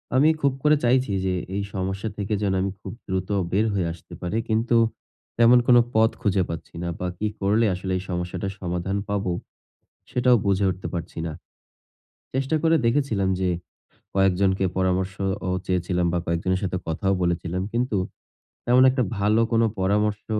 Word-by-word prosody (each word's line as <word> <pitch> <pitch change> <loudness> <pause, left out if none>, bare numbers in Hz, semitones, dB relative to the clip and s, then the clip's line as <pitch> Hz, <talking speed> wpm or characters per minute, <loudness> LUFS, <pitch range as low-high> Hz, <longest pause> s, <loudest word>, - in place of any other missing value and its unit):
আমি 145 +4 +6
খুব 140 -2 +3
করে 150 0 +5
চাইছি 125 -2 +3
যে 95 - +1 0.2
এই 100 - 0
সমস্যা 95 +3 -2
থেকে 100 +1 -2
যেন 100 -2 +1
আমি 95 0 -1
খুব - - -7 0.2
দ্রুত 95 0 -2 0.2
বের 105 +4 +2
হয়ে 90 -4 0
আসতে 85 - -14
পারি, 90 +5 -2
কিন্তু 115 +2 +2 0.6
তেমন 120 +1 +7
কোন 125 - +7 0.2
পথ 110 0 +5
খুঁজে 100 -4 +2
পাচ্ছি 85 0 -7
না, - - -2
বা 90 - -2
কি 110 - -1
করলে 105 +4 +2
আসলে 95 +1 -4
এই 90 - -5
সমস্যাটার 90 +2 -3
সমাধান 90 +2 -2
পাব, 100 -1 0 0.9
সেটাও 125 0 +4
বুঝে 100 0 +2
উঠতে 90 +1 -5
পারছি 85 -1 -5
না। 80 - -3 1.0
চেষ্টা 135 +4 0
করে 165 0 +4
দেখেছিলাম 115 -7 +1
যে, 95 -1 +1 0.7
কয়েকজনকে 95 0 +2
পরামর্শ 95 0 0 0.3
ও - - -1 0.2
চেয়েছিলাম, 90 -1 0
বা 90 - +1
কয়েকজনের 90 +3 0
সাথে 90 -1 -1
কথাও 85 +4 0
বলেছিলাম। 85 +1 -1
কিন্তু 120 -2 0 0.7
তেমন 125 +1 +5
একটা 130 0 +1 0.2
ভালো 105 +3 +3
কোন 115 0 +4 0.2
পরামর্শ 105 +2 +1
95 Hz, 160 wpm, -24 LUFS, 90-115 Hz, 1.0 s, তেমন